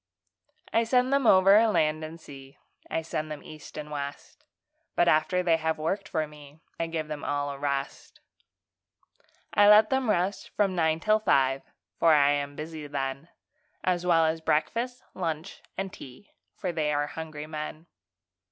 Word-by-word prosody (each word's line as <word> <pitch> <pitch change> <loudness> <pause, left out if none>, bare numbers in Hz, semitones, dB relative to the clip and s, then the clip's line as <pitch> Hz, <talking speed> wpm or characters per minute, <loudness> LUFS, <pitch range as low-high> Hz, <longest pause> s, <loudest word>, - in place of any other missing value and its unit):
I 230 - +4
send 250 +3 +2
them 275 -3 +3
over 195 +4 +7
land 155 -6 +1
and 160 +2 -8
sea, 135 -3 -13 0.3
I 165 - -2
send 155 -1 -4
them 150 -1 -7
east 155 -1 -11
and 150 0 -6
west; 140 -1 -7 0.5
But 175 - +3
after 180 +4 +3
they 165 -2 +3
have 160 0 -1
worked 190 +5 -2
for 160 -3 0
me, 150 0 -15 0.2
I 165 - 0
give 160 -2 -3
them 150 -1 -6
all 145 0 -1
a 140 - -8
rest. 140 -1 -4 1.3
I 205 0 +6
let 210 +2 +7
them 265 -3 +1
rest 190 0 0
from 200 -2 +2
nine 160 -1 +1
till 215 +2 +3
five, 135 -9 +2 0.4
For 165 -2 +6
I 145 -1 +5
am 145 0 -2
busy 155 0 -7
then, 135 +2 -4 0.5
As 180 -1 +1
well 165 -2 +4
as 160 +1 -1
breakfast, 230 +13 -1
lunch, 165 -3 -4 0.2
and 195 0 -3
tea, 130 +10 -12 0.2
For 185 - -3
they 155 -3 0
are 145 0 +1
hungry 155 -1 -7
men. 155 +1 -6
160 Hz, 165 wpm, -27 LUFS, 150-185 Hz, 1.3 s, over